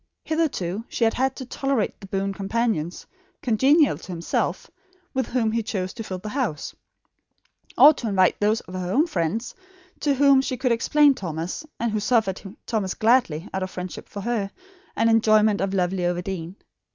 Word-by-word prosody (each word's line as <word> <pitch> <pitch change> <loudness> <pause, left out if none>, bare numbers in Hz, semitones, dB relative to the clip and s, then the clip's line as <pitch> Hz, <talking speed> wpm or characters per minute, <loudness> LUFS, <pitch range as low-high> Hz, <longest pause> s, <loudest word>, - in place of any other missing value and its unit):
Hitherto 230 - -1
she - - -1
had 225 - +3
had 265 +1 0
to 260 - -7
tolerate 270 -3 -1
the 195 - -9
boon 195 0 -2
companions, 195 -4 -2 0.4
congenial 265 - +3
to 185 - -9
himself, 170 -1 -2 0.4
with 260 -3 -1
whom 235 -3 0
he 230 +1 0
chose 195 -4 -3
to 225 - -6
fill 185 -3 -5
the 210 +4 -7
house; 220 - -3 1.0
or 300 - +9
to 240 - -5
invite 190 -3 +3
those 215 +2 +2
of 180 - -13
her 185 -1 -3
own 290 +9 +3
friends 205 - -2 0.5
to 285 -2 +1
whom 275 0 +5
she 260 -1 -3
could 255 0 0
explain 290 +5 +4
Thomas, 175 - -5
and 235 -1 0
who 215 - 0
suffered 210 -3 +1 0.2
Thomas 205 -5 -2
gladly, 215 -8 +2
out 190 - -2
of 185 - -2
friendship 180 -1 -7
for 200 - -6
her, 215 -2 -1 0.5
and 225 - +2
enjoyment 215 -2 +4
of 195 0 0
lovely 185 -1 0
Overdene. 175 0 -3
215 Hz, 175 wpm, -24 LUFS, 185-250 Hz, 1.0 s, or